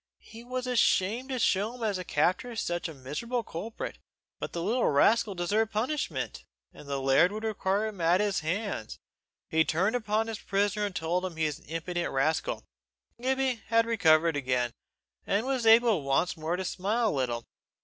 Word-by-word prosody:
He 230 Hz, +1 st, -12 dB
was 250 Hz, +1 st, -4 dB
ashamed 245 Hz, 0 st, +2 dB
to 260 Hz, -, -2 dB
show 210 Hz, -1 st, +1 dB
himself 235 Hz, -3 st, -3 dB
as 200 Hz, -3 st, -1 dB
the 185 Hz, -, -4 dB
captor 180 Hz, -, +1 dB
of 230 Hz, -2 st, -4 dB
such 175 Hz, -3 st, -2 dB
a -, -, -8 dB
miserable 190 Hz, -, -3 dB
culprit, 210 Hz, +5 st, -6 dB, 0.4 s
but -, -, -4 dB
the 170 Hz, -, -3 dB
little 235 Hz, +6 st, +1 dB
rascal 205 Hz, +8 st, +3 dB
deserved 205 Hz, +5 st, 0 dB
punishment, 255 Hz, +8 st, -2 dB, 0.3 s
and 140 Hz, -, -13 dB
the 140 Hz, -1 st, -1 dB
laird 135 Hz, +7 st, +4 dB
would 215 Hz, +1 st, -5 dB
require 205 Hz, -1 st, 0 dB
him 210 Hz, -5 st, -5 dB
at 170 Hz, +3 st, +4 dB
his 205 Hz, -2 st, +1 dB
hands. 180 Hz, -, -3 dB, 0.5 s
He 160 Hz, 0 st, +3 dB
turned 185 Hz, +9 st, +1 dB
upon 220 Hz, -2 st, 0 dB
his 225 Hz, -1 st, -5 dB
prisoner 205 Hz, +1 st, 0 dB
and 195 Hz, -, -9 dB
told 175 Hz, +2 st, -1 dB
him 185 Hz, -3 st, -4 dB
he 160 Hz, 0 st, 0 dB
was 150 Hz, -2 st, -2 dB
an -, -, -22 dB
impudent 170 Hz, +2 st, -3 dB
rascal. 150 Hz, +4 st, 0 dB, 0.6 s
Gibbie 260 Hz, -2 st, 0 dB
had 230 Hz, +1 st, +3 dB
recovered 165 Hz, -8 st, +4 dB
again, 125 Hz, -3 st, 0 dB, 0.6 s
and 205 Hz, +4 st, +1 dB
was 260 Hz, -4 st, 0 dB
able 225 Hz, -5 st, +6 dB
once 140 Hz, +6 st, +1 dB
more 160 Hz, +1 st, -2 dB
to 185 Hz, +1 st, -3 dB
smile 215 Hz, +6 st, 0 dB
a -, -, 0 dB
little. 120 Hz, -4 st, -2 dB
200 Hz, 185 wpm, -29 LUFS, 160-225 Hz, 0.6 s, able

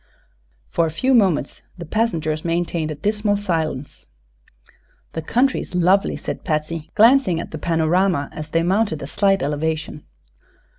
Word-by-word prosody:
For 165 Hz, -, +2 dB
a -, -, -2 dB
few 255 Hz, +12 st, 0 dB
moments 190 Hz, -, +2 dB, 0.2 s
the 170 Hz, -, -7 dB
passengers 160 Hz, -6 st, -1 dB
maintained 170 Hz, -1 st, -1 dB
a 155 Hz, -, -4 dB
dismal 205 Hz, +5 st, 0 dB
silence. 160 Hz, -8 st, -3 dB, 1.1 s
"The 160 Hz, -, -3 dB
country's 245 Hz, -, 0 dB
lovely," 185 Hz, +3 st, +2 dB
said -, -, -6 dB
Patsy, 155 Hz, 0 st, -3 dB
glancing 225 Hz, -6 st, +5 dB
at -, -, -7 dB
the 155 Hz, -, -6 dB
panorama 165 Hz, -1 st, +1 dB
as 155 Hz, 0 st, -7 dB
they 165 Hz, +1 st, +1 dB
mounted 185 Hz, -4 st, 0 dB
a -, -, -4 dB
slight 195 Hz, +5 st, +1 dB
elevation. 150 Hz, +1 st, -2 dB
165 Hz, 140 wpm, -21 LUFS, 155-200 Hz, 1.1 s, glancing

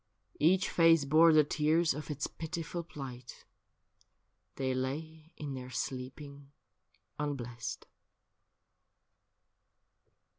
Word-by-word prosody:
Each 185 Hz, +5 st, +4 dB
face 165 Hz, -3 st, +5 dB
bore 160 Hz, +4 st, +6 dB
the 155 Hz, -1 st, +6 dB
tears 155 Hz, +3 st, +2 dB
of 150 Hz, +3 st, -7 dB
its 145 Hz, -2 st, -2 dB
pitiful 170 Hz, +1 st, -5 dB
plight 130 Hz, -6 st, -9 dB, 0.5 s
— -, -, -41 dB
They 130 Hz, -1 st, -1 dB
lay 155 Hz, +5 st, -4 dB
in 145 Hz, -2 st, -5 dB
their 130 Hz, -1 st, -7 dB
sleeping 135 Hz, +4 st, -6 dB, 0.7 s
unblest. 125 Hz, -5 st, -4 dB
150 Hz, 90 wpm, -32 LUFS, 130-160 Hz, 0.7 s, bore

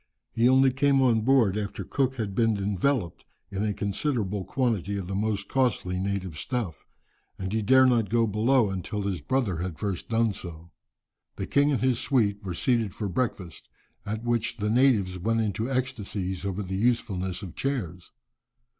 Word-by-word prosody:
He 120 Hz, +2 st, +3 dB
only 130 Hz, 0 st, +5 dB
came 140 Hz, +1 st, +3 dB
on 120 Hz, -4 st, +3 dB
board 115 Hz, -5 st, +3 dB
after 105 Hz, -1 st, -3 dB
Cook 130 Hz, +6 st, 0 dB
had 110 Hz, -5 st, -3 dB
been 115 Hz, 0 st, +2 dB
enveloped 100 Hz, -, -1 dB, 0.3 s
in 100 Hz, +1 st, -2 dB
a 105 Hz, -, +1 dB
considerable 100 Hz, -1 st, -2 dB
quantity 105 Hz, -5 st, -1 dB
of 95 Hz, -, -4 dB
the 95 Hz, -, -5 dB
most 100 Hz, 0 st, -1 dB
costly 110 Hz, -9 st, 0 dB
native 95 Hz, -5 st, -3 dB
stuff, 110 Hz, -, -4 dB, 0.5 s
and 95 Hz, +1 st, -4 dB
he 110 Hz, -, +1 dB
dared 130 Hz, +4 st, +5 dB
not 115 Hz, -5 st, +2 dB
go 115 Hz, +1 st, +3 dB
below 110 Hz, +1 st, +2 dB
until 95 Hz, +2 st, -3 dB
his 95 Hz, -3 st, -2 dB
brother 125 Hz, -9 st, 0 dB
had 90 Hz, -1 st, -4 dB
first 100 Hz, -4 st, -4 dB
done 115 Hz, -2 st, +2 dB
so. 85 Hz, -2 st, -9 dB, 0.6 s
The -, -, -4 dB
king 145 Hz, +1 st, +3 dB
and 135 Hz, -, 0 dB
his 130 Hz, -2 st, +2 dB
suite 105 Hz, -6 st, +1 dB
were 90 Hz, -3 st, -4 dB
seated 115 Hz, -3 st, 0 dB
for 105 Hz, -, -3 dB
breakfast, 95 Hz, -4 st, -3 dB, 0.3 s
at 110 Hz, +2 st, -4 dB
which 120 Hz, -1 st, -1 dB
the 105 Hz, -1 st, -1 dB
natives 110 Hz, -8 st, +3 dB
went 115 Hz, +5 st, +1 dB
into 110 Hz, +3 st, -2 dB
ecstasies 105 Hz, -8 st, -3 dB
over 100 Hz, +1 st, -2 dB
the 95 Hz, 0 st, -4 dB
usefulness 100 Hz, -5 st, 0 dB
of 90 Hz, -, -7 dB
chairs. 95 Hz, -, -4 dB
105 Hz, 170 wpm, -27 LUFS, 95-125 Hz, 0.6 s, only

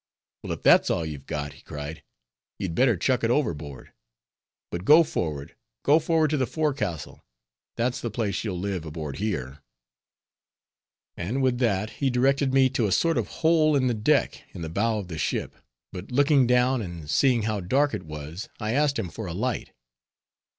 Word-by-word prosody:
"Well -, -, -4 dB
if -, -, -9 dB
that's -, -, +6 dB
all 85 Hz, -, 0 dB
you've 75 Hz, -3 st, -7 dB
got," 75 Hz, -1 st, -4 dB
he 70 Hz, -, -17 dB
cried, 75 Hz, +2 st, -7 dB, 0.6 s
"you'd 90 Hz, -4 st, -3 dB
better 120 Hz, 0 st, +3 dB
chuck 125 Hz, +7 st, +1 dB
it 115 Hz, -, +2 dB
overboard. 80 Hz, -, -2 dB, 0.8 s
But 85 Hz, +1 st, -4 dB
go 155 Hz, -, +7 dB
forward, 75 Hz, -, -4 dB, 0.3 s
go 150 Hz, +3 st, +5 dB
forward 160 Hz, -1 st, +1 dB
to 155 Hz, -, +1 dB
the 130 Hz, -3 st, 0 dB
forecastle; 120 Hz, -, -3 dB, 0.5 s
that's 120 Hz, +2 st, -1 dB
the 120 Hz, -, -2 dB
place 110 Hz, -3 st, -2 dB
you'll 100 Hz, -5 st, -3 dB
live 95 Hz, -1 st, -2 dB
in 80 Hz, -, -9 dB
aboard 75 Hz, -3 st, -6 dB
here." 75 Hz, -10 st, -3 dB, 1.5 s
And 120 Hz, +10 st, -2 dB
with 125 Hz, -2 st, +1 dB
that 110 Hz, -3 st, 0 dB
he 135 Hz, -, +3 dB
directed 135 Hz, +2 st, +2 dB
me 135 Hz, 0 st, +5 dB
to 120 Hz, -4 st, +1 dB
a -, -, -2 dB
sort 165 Hz, -, +2 dB
of -, -, -2 dB, 0.2 s
hole 155 Hz, -2 st, +4 dB
in 135 Hz, -2 st, +2 dB
the 125 Hz, -, +2 dB
deck 105 Hz, -1 st, +1 dB
in 85 Hz, -, -6 dB
the 80 Hz, -, -4 dB
bow 110 Hz, +6 st, 0 dB
of 100 Hz, -4 st, -5 dB
the 80 Hz, -3 st, -6 dB
ship; -, -, -2 dB, 0.4 s
but 90 Hz, +1 st, -7 dB
looking 140 Hz, 0 st, +4 dB
down, 125 Hz, +1 st, +3 dB
and 85 Hz, -6 st, -7 dB
seeing 120 Hz, -, +3 dB
how 110 Hz, -1 st, -1 dB
dark 135 Hz, +11 st, +1 dB
it -, -, -3 dB
was, 75 Hz, +4 st, -8 dB
I 110 Hz, 0 st, -2 dB
asked 145 Hz, 0 st, +2 dB
him 105 Hz, -6 st, -3 dB
for 110 Hz, -3 st, -6 dB
a 85 Hz, -, -5 dB
light. 120 Hz, +4 st, -2 dB
110 Hz, 185 wpm, -26 LUFS, 85-130 Hz, 1.5 s, go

